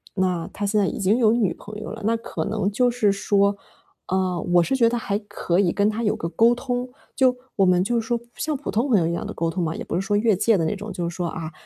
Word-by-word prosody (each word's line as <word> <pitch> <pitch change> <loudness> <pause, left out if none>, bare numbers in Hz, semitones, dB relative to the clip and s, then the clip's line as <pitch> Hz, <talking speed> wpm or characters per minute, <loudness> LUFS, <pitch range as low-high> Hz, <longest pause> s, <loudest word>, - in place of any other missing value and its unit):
那 180 -3 0
他 205 - -6
现 210 +1 +1
在 200 - +3
已 - - -4
经 200 +4 +2
有 225 -3 +4
女 225 -6 +1
朋 210 0 -9
友 - - -6
了， 220 0 -8
那 225 +1 +2
可 225 - -5
能 205 -1 -1
就 245 +4 +2
是 225 -4 +2
说， 200 0 +2 0.5
啊， 185 -1 0
我 175 +1 +3
是 265 - 0
觉 235 -3 +4
得 240 - -1
还 205 -3 -2
可 190 -4 -2
以 185 -4 +3
跟 200 +3 +2
他 215 +2 -3
有 210 - +1
个 165 - -4
沟 230 +6 +4
通。 245 0 -3 0.3
就， 255 -2 +3 0.2
我 195 - +3
们 180 0 +4
就 235 +4 0
说 235 +1 -1 0.2
像 310 -1 -2
普 280 - -6
通 235 +6 +1
朋 220 -6 +5
友 165 - +1
一 - - -1
样 - - -3
地 - - -5
沟 165 - -1
通 180 +1 -2
嘛， 160 0 -2
也 - - -5
不 - - -4
是 180 - +1
说 205 +2 -1
越 215 0 +3
界 220 +4 +3
的 165 - 0
那 160 - -1
种。 205 0 -7
就 175 -2 -2
是 170 - -9
说， 175 -1 -2
啊， 160 -1 -5
205 Hz, 310 characters per minute, -23 LUFS, 180-230 Hz, 0.5 s, 朋